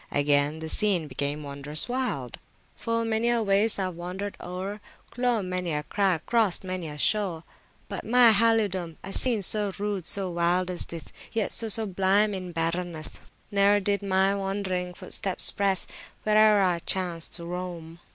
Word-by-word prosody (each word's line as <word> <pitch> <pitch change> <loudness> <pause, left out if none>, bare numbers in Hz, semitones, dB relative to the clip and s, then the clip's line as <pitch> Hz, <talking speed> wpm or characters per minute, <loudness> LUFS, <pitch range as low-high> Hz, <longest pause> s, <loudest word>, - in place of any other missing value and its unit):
Again 145 +1 +2
the 160 0 -6
scene 180 -2 +2
became 145 +2 -3
wondrous 140 - 0
wild: 245 - -3 0.4
Full 230 0 -1
many 225 +1 +1
a 235 -1 +2
waste 205 +1 +2
Ive 185 -1 -1
wanderd 180 +4 -5
oer, 190 +4 -5 0.3
Clomb 240 -5 0
many 180 -2 -2
a 150 0 -1
crag, 190 0 0
crossd 220 -7 +1
many 185 -3 -4
a 150 -1 -7
shore, 180 -1 +1 0.4
But, 200 - -5
by - - -10
my 245 -1 +7
halidome, 205 -6 +2
A 195 - -6
scene 235 -6 +2
so 205 +1 +1
rude, 200 -4 -3
so 195 -2 0
wild 175 +2 +1
as 180 - -3
this, 165 -1 -8 0.2
Yet 225 -3 -1
so 225 - +1
sublime 205 -1 +2
in 185 -2 -5
barrenness, 165 -1 -3 0.3
Neer 200 0 +4
did 200 +1 0
my 195 0 +2
wandering 195 -2 -3
footsteps 190 +1 +1
press, 195 -2 0 0.4
Whereer 215 -1 +5
I 180 -2 +1
chanced 175 -2 -2
to 170 - -6
roam. 170 -2 -6
190 Hz, 160 wpm, -26 LUFS, 170-210 Hz, 0.4 s, my